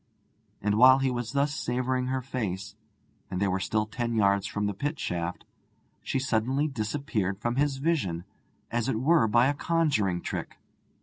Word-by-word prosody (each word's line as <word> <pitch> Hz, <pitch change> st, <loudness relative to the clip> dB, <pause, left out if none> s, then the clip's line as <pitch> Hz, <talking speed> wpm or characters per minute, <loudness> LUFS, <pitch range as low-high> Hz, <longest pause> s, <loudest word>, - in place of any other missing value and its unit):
And 105 Hz, +1 st, +1 dB
while 130 Hz, +2 st, +8 dB
he 135 Hz, -1 st, +1 dB
was 120 Hz, 0 st, -3 dB
thus 140 Hz, +1 st, +1 dB
savouring 125 Hz, 0 st, -1 dB
her 130 Hz, 0 st, -1 dB
face, 105 Hz, -8 st, -4 dB, 0.6 s
and 90 Hz, -, -3 dB
they 100 Hz, -, +2 dB
were 95 Hz, 0 st, 0 dB
still 105 Hz, +3 st, 0 dB
ten 115 Hz, +1 st, -3 dB
yards 100 Hz, -1 st, +3 dB
from 105 Hz, 0 st, -2 dB
the 105 Hz, -, -1 dB
pit 145 Hz, -, -3 dB
shaft, 85 Hz, 0 st, -3 dB, 0.6 s
she -, -, -2 dB
suddenly 130 Hz, +3 st, +1 dB
disappeared 110 Hz, -6 st, -2 dB
from 120 Hz, +3 st, -2 dB
his 140 Hz, -1 st, +1 dB
vision, 135 Hz, -, 0 dB, 0.5 s
as 120 Hz, +1 st, 0 dB
it 110 Hz, -, 0 dB
were 140 Hz, -2 st, +4 dB
by 120 Hz, +3 st, +4 dB
a 145 Hz, -, +2 dB
conjuring 140 Hz, -, +1 dB
trick. -, -, -5 dB
120 Hz, 170 wpm, -28 LUFS, 105-135 Hz, 0.6 s, while